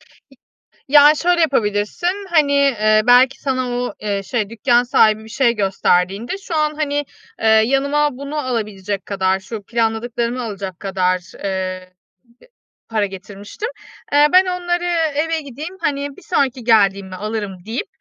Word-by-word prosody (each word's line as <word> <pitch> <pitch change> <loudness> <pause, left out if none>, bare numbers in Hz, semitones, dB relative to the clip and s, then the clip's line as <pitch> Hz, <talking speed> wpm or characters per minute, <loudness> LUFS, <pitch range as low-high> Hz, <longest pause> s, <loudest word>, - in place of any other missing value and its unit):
İ - - -23 0.9
ya 295 0 +8
şöyle 350 0 +2
yapabilirsin. 280 - 0
Hani, 300 -4 +3
eee, 215 -6 +3
belki, 250 +2 +5
sana 255 -2 -1
o, 245 0 -3
eee, 205 -2 -2
şey 215 0 -2
dükkân 240 +2 +2
sahibi 220 -3 +3
bir - - -12
şey 235 +1 +1
gösterdiğinde, 195 - 0
"Şu 390 -4 -7
an, 305 0 +1
hani, 290 -1 -1 0.4
eee, 225 - -1
yanıma 275 +6 +2
bunu 280 +2 -6
alabilecek 210 -7 -3
kadar, 190 -1 0
şu 205 +2 -7
planladıklarımı 235 +2 -2
alacak 195 -5 -6
kadar, 185 -2 0 0.3
eee, 200 - -1
eee, 185 -1 -4 1.0
para 210 -2 +2
getirmiştim. 200 - -7 0.4
Eee, 290 +1 +6
ben 370 +1 +7
onları 350 -1 -2 0.3
eve 325 +2 0
gideyim, 300 +6 -8
hani, 285 -2 -2
bir - - -14
sonraki 260 -2 -1
geldiğimde 200 -4 +2
alırım." 205 -1 -4
deyip, 230 - -4
235 Hz, 145 wpm, -19 LUFS, 205-285 Hz, 1.0 s, ya